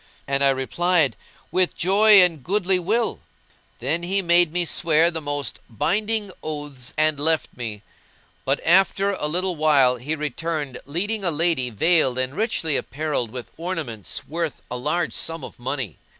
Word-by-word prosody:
And 140 0 +1
I 140 - +5
replied, 150 +4 +1 0.4
"With 185 -1 +1
joy 200 +2 +6
and 165 -6 0
goodly 190 +1 +1
will." 220 +6 0 0.6
Then 150 +7 -1
he 190 +3 0
made 175 -1 +4
me 175 +1 0
swear 165 0 +2
the 165 -1 -5
most 145 -1 -3
binding 205 - -1
oaths 145 -5 -6
and 155 -2 +2
left 160 +2 0
me; 110 -4 -6 0.6
but - - 0
after 195 +3 +4
a 170 -6 -2
little 180 +3 -1
while 140 -5 +4
he 145 +6 -3
returned 150 -2 -3
leading 200 +8 -2
a 180 - +2
lady 160 -5 +1
veiled 135 - +2
and 130 +1 -2
richly 170 - 0
apparelled 145 -5 -2
with 125 +1 -8
ornaments 160 - -4
worth 165 -2 -3
a - - -2
large 150 +7 -1
sum 165 -2 -3
of - - -10
money. 130 - -4
160 Hz, 155 wpm, -23 LUFS, 135-180 Hz, 0.6 s, joy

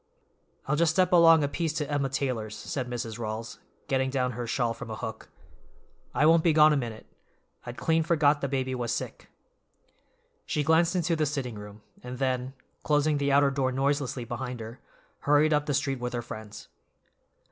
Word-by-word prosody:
"I'll 150 - 0
just 160 0 +2
step 185 0 +2
along 165 -2 +7
a - - +2
piece 160 +2 -2
to 150 -2 -2
Emma 145 -2 -1
Taylor's," 125 -6 -2
said 125 -2 -4
Mrs. 120 -2 -5
Rawls, 110 0 -5 0.3
getting 130 -1 +1
down 130 -2 0
her 120 0 -5
shawl 120 -1 0
from 115 0 -9
a 110 - -4
hook. 100 - -7 0.9
"I 150 - +3
won't 165 +1 +5
be 165 - +4
gone 155 0 +6
a - - +2
minute. 115 -5 -4 0.6
I'd 120 0 -7
clean 165 0 +2
forgot 150 -3 +2
the 140 - 0
baby 130 -1 -2
was 120 -2 -2
sick." - - -5 1.2
She 150 - 0
glanced 165 +3 +3
into 170 -1 +1
the 155 -1 0
sitting 135 -4 -3
room, 105 0 -11 0.2
and 125 +1 -7
then, 130 0 -1 0.3
closing 150 0 +1
the 140 0 +1
outer 140 0 +4
door 135 -1 0
noiselessly 135 -1 -1
behind 125 +1 -5
her, 115 +2 -8 0.4
hurried 150 +2 +3
up 150 0 +1
the 145 - 0
street 135 -2 -1
with 125 0 -4
her 120 -1 -3
friends. 110 -2 -9
135 Hz, 185 wpm, -27 LUFS, 120-150 Hz, 1.2 s, along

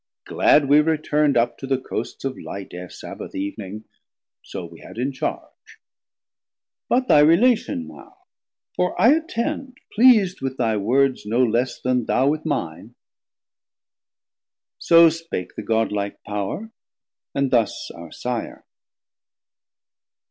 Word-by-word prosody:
Glad 145 -1 +3
we 145 +2 +6
return'd 150 -2 +1
up 120 0 +1
to 135 - -6
the 135 -1 +1
coasts 130 - -6
of 135 -1 -2
Light 100 0 -8
Ere 90 0 -8
Sabbath - - -9
Eev'ning: 100 +1 -5 0.6
so 90 - -7
we 85 0 -13
had - - -13
in 130 +4 -1
charge. 130 - -6 1.1
But 255 +1 +2
thy 150 - +6
relation 165 - +3
now; 75 -3 -14 0.6
for 180 0 -1
I 230 - +6
attend, 270 -4 -3 0.2
Pleas'd 215 -6 +5
with 135 0 -3
thy 115 -3 +1
words 125 +3 +1
no 120 +4 +2
less 120 +2 0
then 125 -2 0
thou 130 +4 +2
with 155 +2 -2
mine. 85 - -4 1.8
So 165 0 +7
spake 165 - -6
the - - -5
Godlike 105 -3 -1
Power, 105 - -4 0.6
and 140 -1 0
thus 115 -4 0
our 85 -1 -11
Sire. 125 -2 -5
130 Hz, 125 wpm, -22 LUFS, 105-160 Hz, 1.8 s, So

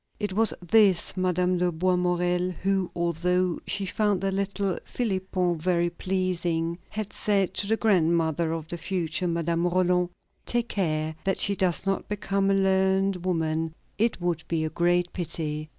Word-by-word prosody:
It 205 -2 -2
was 220 +3 +4 0.2
this 200 -4 +4
Madame 180 -1 +1
de 180 0 +2
Boismorel 180 +1 +1
who, 190 0 0
although 175 +1 0
she 195 - 0
found 205 0 +1
the 195 +1 -1
little 195 -1 -1
Philipon 185 -6 -1
very 175 0 +1
pleasing, 175 -3 -1
had 215 -1 -5
said 200 -3 +1
to 200 - -2
the 225 +1 +2
grandmother 170 -6 +2
of 165 -1 -4
the 175 - -6
future 180 -1 -2
Madame 170 0 0
Roland: 180 0 +2 0.3
"Take 240 -1 -1
care 155 -5 -1
that 195 -1 0
she 200 - +1
does 185 -1 +1
not 195 0 -1
become 200 -1 0
a 195 - +3
learned 190 -1 +2
woman; 160 -2 -1 0.2
it 225 -2 +1
would 175 -2 -1
be 160 -2 0
a 155 - -3
great 175 0 +1
pity." 155 -3 -3
180 Hz, 155 wpm, -26 LUFS, 170-195 Hz, 0.3 s, was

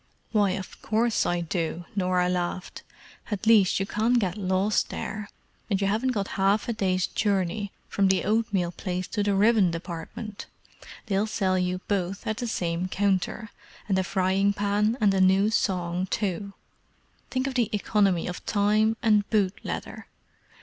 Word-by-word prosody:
"Why, 205 -3 +3
of 190 -1 -7
course 225 +1 +1
I 175 0 0
do," 170 0 -3
Norah 180 -2 +1
laughed. 180 +1 -3 0.5
"At 210 -1 -3
least 215 -5 +5
you 195 - 0
can't 225 +5 +1
get 190 -6 0
lost 195 +1 +1
there, 210 -1 -5 0.4
and 195 -3 +1
you 200 - 0
haven't 220 +6 +1
got 205 -5 -1
half 200 +2 +2
a 235 - 0
day's 185 -4 +1
journey 200 -1 -1 0.2
from 200 -1 +2
the 190 0 +2
oatmeal 205 -5 +1
place 180 +1 -4
to 210 - -1
the 205 -1 +1
ribbon 210 -2 +4
department: 170 +5 -6 0.6
they'll 205 -1 0
sell 195 -3 0
you 180 0 -1
both 195 -1 -2
at 215 0 -2
the 245 -1 -3
same 175 -4 -1
counter, 200 +3 -1 0.4
and 190 -2 +2
a - - +1
frying 190 +1 +1
pan 205 +3 +1
and 205 -3 +4
a 190 - +2
new 190 +3 +4
song 180 -4 0
too! 200 0 -2 0.8
Think 260 0 -1
of 275 - -2
the 240 -4 +1
economy 200 -4 +1
of 180 - -5
time 215 +2 +2
and 210 -3 +3
boot 200 -4 +2
leather! - - -6
200 Hz, 165 wpm, -26 LUFS, 185-215 Hz, 0.8 s, least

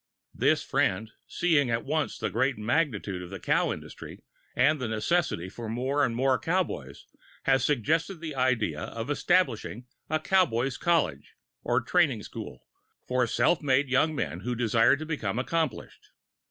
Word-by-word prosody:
This - - +2
[Pg - - -22
19]friend, 105 +4 +1 0.2
seeing 155 -7 +2
at 115 0 -1
once 155 +1 -1
the - - -3
great 130 +3 +1
magnitude 105 - -1
of 90 - -8
the 95 0 -7
cow - - +1
industry - - -9 0.3
and 140 +3 +3
the 125 - -1
necessity 110 - 0
for 110 +4 -7
more 130 +5 0
and 120 -4 0
more 130 +1 +2
cowboys, 120 - -2 0.4
has 135 -2 +3
suggested 155 - +1
the 160 -2 -5
idea 120 - 0
of 115 +5 -5
establishing 140 - +1 0.2
a 155 +1 +1
cowboys' 135 -8 +1
college, 165 - 0 0.3
or - - +1
training - - +2
school, - - -9 0.4
for 125 -1 +1
self 170 - +2
made 140 -1 +2
young 150 +4 +2
men 85 - -3
who 125 +6 -3
desire 115 +1 +3
to 155 - -6
become 120 -10 -3
accomplished. 155 0 -3
130 Hz, 155 wpm, -28 LUFS, 115-155 Hz, 0.4 s, and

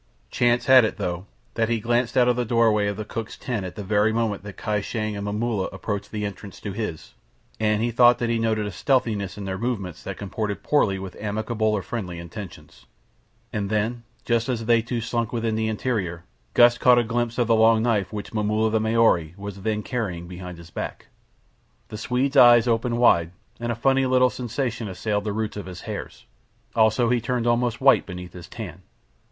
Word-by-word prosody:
Chance 120 0 +2
had 130 -2 +8
it, 110 - -1
though, 90 +2 -3 0.3
that 115 0 0
he 115 -1 +1
glanced 120 +3 0
out 125 -1 +5
of 125 - +3
the 125 - 0
doorway 110 -3 +2
of 100 -1 -2
the 110 - -4
cook's 115 0 -6
tent 120 -6 -3
at 90 - -10
the 105 - -6
very 105 +2 +2
moment 110 -4 -1
that 100 0 -10
Kai 105 -2 -1
Shang 110 0 -3
and 100 - -4
Momulla 105 -1 -1
approached 100 +1 -4
the 105 -1 -3
entrance 100 -1 -8
to 105 - -4
his, 100 -6 -5 0.5
and 110 0 +1
he 120 - 0
thought 120 +1 +6
that 120 - -1
he 115 0 0
noted 110 -2 0
a 105 - -4
stealthiness 105 - 0
in 100 - -6
their 95 -1 -4
movements 100 -8 -3
that - - -6
comported 105 +1 -4
poorly 110 -10 +2
with 95 -1 -7
amicable 110 +1 -1
or 105 -3 +1
friendly 95 -8 -5
intentions, 90 +3 -10 0.7
and 100 -3 -2
then, 110 +3 -1 0.2
just 115 +1 +1
as 115 -3 -2
they 115 0 +4
two 120 +1 -3
slunk 115 0 -2
within 115 -2 -1
the 110 0 0
interior, 105 -7 -2 0.3
Gust 120 0 +6
caught 125 -1 +6
a 120 - +4
glimpse 120 0 -2
of 120 - +2
the 115 - +3
long 110 0 +5
knife 105 -6 +1
which 105 0 -6
Momulla 110 +1 +1
the 110 - +2
Maori 110 -7 +2
was 100 -1 -7
then 105 +1 -1
carrying 95 -9 -3
behind 90 0 -8
his 85 -1 -13
back. - - -6 0.8
The 105 - -6
Swede's 130 +4 -1
eyes 120 -1 +7
opened 115 0 +1
wide, 85 -8 +4 0.3
and 120 0 -2
a - - -2
funny 135 +3 +2
little 130 0 +4
sensation 120 -2 -3
assailed 105 +2 -2
the 105 - -1
roots 110 0 -3
of 100 - -6
his 90 -2 -8
hairs. - - -7 0.5
Also 110 +1 +3
he 120 -1 +2
turned 120 0 -1
almost 120 0 +1
white 135 -1 +4
beneath 90 -2 -8
his 85 -2 -10
tan. 95 -4 -8
110 Hz, 205 wpm, -24 LUFS, 100-120 Hz, 0.8 s, had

